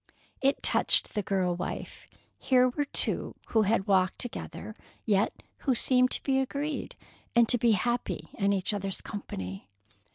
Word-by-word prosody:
It 275 +1 +2
touched - - +3
the 210 - 0
girl 185 -3 0
wife. 180 +1 -6 0.3
Here 255 -1 +4
were 290 +4 -1
two - - -2
who 220 - +3
had 210 -1 +2
walked 190 -3 +2
together, 215 -4 -5 0.3
yet 205 -1 +1
who 265 -3 +1
seemed 255 +1 +3
to - - 0
be 265 -1 +2
agreed, 285 +3 -3 0.4
and 235 -1 +6
to 245 - +3
be 230 -1 +4
happy 240 +4 -1
in 200 -1 +1
each 195 +1 +1
other's 195 -1 -3
company. 95 - -6
220 Hz, 155 wpm, -29 LUFS, 195-250 Hz, 0.4 s, and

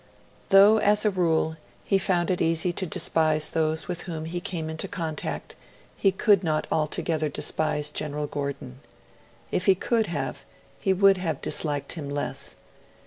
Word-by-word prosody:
Though, 205 +2 +7
as 210 +1 +3
a 210 - +4
rule, 160 -3 +1 0.3
he 195 - +2
found 175 -1 +1
it 180 - -1
easy 165 +2 +1
to 185 +1 -2
despise 155 -2 +1
those 160 0 0
with 175 -1 -3
whom 160 -2 -4
he 175 +2 -4
came 170 -4 -4
into 160 +4 -3
contact, 165 -6 -4 0.4
he 195 - +3
could 195 0 +3
not 155 -2 0
altogether 155 0 0
despise 150 0 -1
General 150 0 -2
Gordon. 140 -3 -5 0.7
If 180 - 0
he 195 - +6
could 225 +3 0
have, 140 -3 -3 0.4
he 195 - +1
would 195 +1 +5
have 165 -6 -2
disliked 145 -3 -2
him 150 -4 -5
less. 145 0 -3
165 Hz, 155 wpm, -26 LUFS, 155-190 Hz, 0.7 s, Though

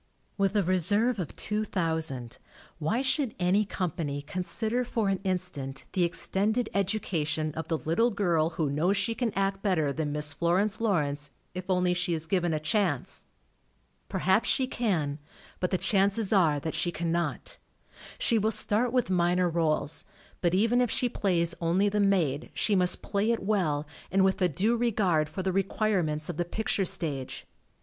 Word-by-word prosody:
With 200 0 0
a 205 - +3
reserve 205 +6 +2
of 175 - -5
two 215 0 -1
thousand, 160 - -2 0.4
why 215 - 0
should 265 -2 0
any 185 +4 +2
company 160 -7 -3
consider 215 +9 -1
for 225 -4 -1
an 195 -1 0
in 185 -2 +1
stant 140 -7 -5
the 185 - +2
extended 210 +6 +2
education 165 -6 -1
of 160 0 -5
the 165 - 0
little 170 +11 +1
girl 175 -7 +1
who 150 -4 0
knows 175 +8 +1
she 230 - 0
can 235 -1 -1
act 195 0 0
better 160 -9 +1
than 155 -1 -2
Miss 150 0 -1
Florence 195 +6 +1
Lawrence, 145 -9 0 0.2
if 185 +1 -7
only 180 -1 +2
she 175 -1 0
is 160 0 -4
given 175 0 0
a 155 - 0
chance? 155 - -1 0.8
Perhaps 190 +5 +2
she 265 - +2
can, 170 - -1 0.4
but 180 - 0
the 185 - +1
chances 200 +2 +2
are 160 -7 +4
that 160 +2 -4
she 160 +3 0
cannot. 170 +1 -2 0.6
She 230 - +3
will 215 +1 +1
start 225 +2 +1
with 250 -6 +1
minor 175 0 +2
rdles, 160 -2 0 0.4
but 175 0 +2
even 230 +5 +3
if 245 - +1
she 250 - +1
plays 175 -6 0
only 180 +5 +2
the 210 +1 -1
maid 175 -8 +1
she 210 - +1
must 180 -1 +3
play 205 +2 0
it 230 -3 0
well 175 -8 0 0.2
and 190 +1 +3
with 190 +1 +1
a 180 - +4
due 210 - +1
regard 195 -10 +1
for 190 +5 -4
the 190 - 0
re 195 - +3
quirements 180 -7 -1
of 175 - -4
the 175 - 0
picture 200 +1 -1
stage. 145 -7 -2
185 Hz, 175 wpm, -28 LUFS, 160-210 Hz, 0.8 s, are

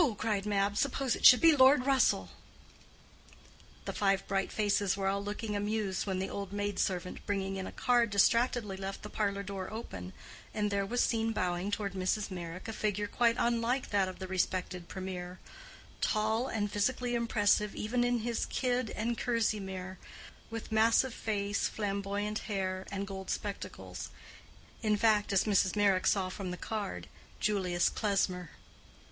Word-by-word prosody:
cried 210 -2 -1
Mab. 200 0 +1
"Suppose 270 -1 +1
it - - +7
should 250 - +8
be 330 -2 +7
Lord 260 -1 +6
Russell!" 250 - +3 1.5
The - - -3
five 195 -1 +1
bright 195 0 0
faces 205 -2 +1
were 195 - -2
all 200 +1 0
looking 210 +1 -4
amused 205 -1 -1
when 190 -1 -1
the 190 +1 -1
old 200 -1 -5
maid 205 -1 -2
servant 180 -1 -2
bringing 195 -1 -1
in 190 - -4
a - - -7
card 240 -2 +2
distractedly 215 0 +2
left 195 0 -5
the 210 - -7
parlor 200 -2 -1
door 195 -1 -5
open, 95 - -7 0.4
and 210 -1 0
there 200 -1 0
was 245 +4 +1
seen 225 -1 +1
bowing 180 -1 -1
toward 205 -1 -2
Mrs. 195 +2 -1
Meyrick 175 0 -6
a 225 - -4
figure 210 -1 -1
quite 230 +2 +2
unlike 235 +2 0
that 200 -2 +3
of 185 - -8
the 190 - -6
respected 185 -1 -2
Premier—tall 190 - -3
and 205 -2 -2
physically 245 +4 0
impressive 210 -3 +2
even 240 +3 0
in 245 -1 +1
his 235 0 -1
kid 250 -3 0
and 230 +2 -2
kerseymere, 190 -6 -1 0.5
with 225 0 -6
massive 225 +3 +4
face, 200 -3 -1
flamboyant 205 0 -2
hair, 190 -2 -2
and 200 0 -3
gold 190 -1 -7
spectacles: 205 -1 -5 0.7
in 215 -2 +2
fact, 210 -1 +3
as 195 - +4
Mrs. 200 -2 +2
Meyrick 200 -3 +3
saw 190 -2 +2
from 185 0 -5
the 180 - -4
card, 200 - -4 0.3
Julius 185 -4 +1
Klesmer. 185 -5 0
205 Hz, 155 wpm, -32 LUFS, 190-225 Hz, 1.5 s, should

